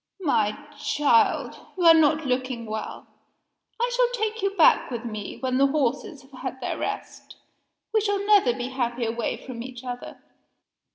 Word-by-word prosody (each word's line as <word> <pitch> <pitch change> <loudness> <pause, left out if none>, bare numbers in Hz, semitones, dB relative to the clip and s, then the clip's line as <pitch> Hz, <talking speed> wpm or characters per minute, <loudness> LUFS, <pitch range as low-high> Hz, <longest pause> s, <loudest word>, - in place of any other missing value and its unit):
My 215 -9 +2 0.3
child! 285 -6 +2 0.2
you 360 - -1
are 330 -1 +9
not 310 -1 +3
looking 255 -2 -2
well. 220 0 -6 0.7
I 485 +1 0
shall - - +3
take 440 +1 -2
you 395 - +2
back 330 - +5
with 240 -2 -5
me, 215 -3 -6
when 255 -1 -1
the 275 - +5
horses 275 0 -1
have 270 - -21
had 260 0 -5
their - - -4
rest. - - -6 0.6
We 435 - +3
shall 405 -1 -1
never 405 -11 +5
be 245 +1 -4
happy 240 -2 -2
away 230 +1 -2
from 245 -3 -8
each 250 0 -8
other." 245 -1 -7
260 Hz, 165 wpm, -25 LUFS, 240-325 Hz, 0.7 s, are